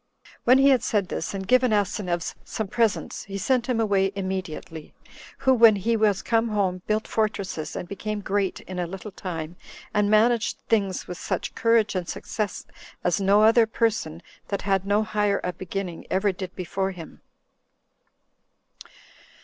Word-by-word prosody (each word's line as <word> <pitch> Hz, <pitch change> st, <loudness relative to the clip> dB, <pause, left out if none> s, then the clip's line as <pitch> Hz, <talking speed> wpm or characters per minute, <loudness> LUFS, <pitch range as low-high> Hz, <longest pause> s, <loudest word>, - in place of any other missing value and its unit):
When 255 Hz, +2 st, +7 dB
he 275 Hz, +1 st, +6 dB
had 260 Hz, -3 st, +4 dB
said 205 Hz, -5 st, 0 dB
this, -, -, -3 dB
and 190 Hz, -1 st, -5 dB
given 255 Hz, 0 st, +4 dB
Asineus 195 Hz, -4 st, -1 dB
some 220 Hz, -, -4 dB
presents, 225 Hz, +1 st, -1 dB
he 195 Hz, -1 st, -5 dB
sent 250 Hz, +4 st, 0 dB
him 240 Hz, -3 st, +1 dB
away 195 Hz, -3 st, +2 dB
immediately; 185 Hz, -4 st, -5 dB, 0.4 s
who, 265 Hz, -, +3 dB
when 230 Hz, -3 st, +7 dB
he 220 Hz, +4 st, 0 dB
was 210 Hz, -3 st, +2 dB
come 230 Hz, 0 st, +2 dB
home, 195 Hz, -4 st, 0 dB
built 215 Hz, +1 st, 0 dB
fortresses, 200 Hz, -7 st, -2 dB
and 180 Hz, -, -5 dB
became 205 Hz, +2 st, -4 dB
great 195 Hz, -1 st, -1 dB
in 185 Hz, -1 st, -7 dB
a 175 Hz, -, -1 dB
little 195 Hz, +4 st, -7 dB
time, 170 Hz, -3 st, -6 dB, 0.4 s
and 210 Hz, -1 st, +2 dB
managed 225 Hz, +2 st, +3 dB
things 200 Hz, -5 st, 0 dB
with 180 Hz, -, -7 dB
such -, -, -3 dB
courage 230 Hz, -2 st, +2 dB
and 180 Hz, -3 st, -3 dB
success, 210 Hz, -3 st, -4 dB, 0.4 s
as 175 Hz, +2 st, +1 dB
no 200 Hz, +2 st, +4 dB
other 225 Hz, +1 st, +6 dB
person, 205 Hz, -8 st, -1 dB, 0.2 s
that 200 Hz, -, -3 dB
had 195 Hz, -1 st, 0 dB
no 205 Hz, +2 st, +3 dB
higher 210 Hz, -1 st, 0 dB
a 180 Hz, -, -2 dB
beginning, 185 Hz, -2 st, -5 dB
ever 195 Hz, +2 st, +2 dB
did 185 Hz, 0 st, -7 dB
before 190 Hz, +1 st, -2 dB
him. 180 Hz, -4 st, -10 dB
200 Hz, 160 wpm, -25 LUFS, 185-220 Hz, 0.4 s, When